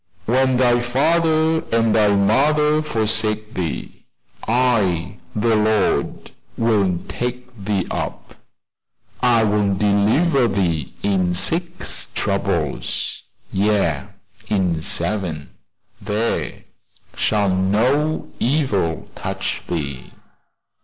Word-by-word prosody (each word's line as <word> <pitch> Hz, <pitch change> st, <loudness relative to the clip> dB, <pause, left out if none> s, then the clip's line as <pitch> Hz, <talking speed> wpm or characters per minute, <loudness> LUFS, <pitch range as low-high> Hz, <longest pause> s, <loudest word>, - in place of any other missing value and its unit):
"When 130 Hz, +2 st, +2 dB
thy 120 Hz, -1 st, +4 dB
father 160 Hz, +6 st, +2 dB
and 115 Hz, -1 st, +2 dB
thy 105 Hz, -2 st, +4 dB
mother 150 Hz, +9 st, +3 dB
forsake 110 Hz, -5 st, 0 dB
thee, 85 Hz, -5 st, -5 dB, 0.4 s
I, 105 Hz, -7 st, +1 dB, 0.2 s
the 110 Hz, +1 st, +2 dB
Lord, 105 Hz, -2 st, 0 dB, 0.3 s
will 100 Hz, -6 st, +2 dB
take 125 Hz, 0 st, -5 dB
thee 95 Hz, -2 st, 0 dB
up." -, -, -5 dB, 0.9 s
"I 120 Hz, -3 st, +4 dB
will 105 Hz, -2 st, +1 dB
deliver 110 Hz, -, +2 dB
thee 85 Hz, -, -1 dB
in 95 Hz, -3 st, +1 dB
six 170 Hz, -, 0 dB
troubles; -, -, -2 dB, 0.3 s
yea, 95 Hz, -7 st, +1 dB, 0.4 s
in 90 Hz, -6 st, 0 dB
seven 85 Hz, -5 st, -2 dB, 0.5 s
there 105 Hz, +3 st, -2 dB, 0.5 s
shall 100 Hz, -3 st, +1 dB
no 125 Hz, +12 st, +1 dB
evil 115 Hz, -, 0 dB
touch -, -, -4 dB
thee." 70 Hz, -6 st, -5 dB
110 Hz, 90 wpm, -20 LUFS, 95-125 Hz, 0.9 s, thy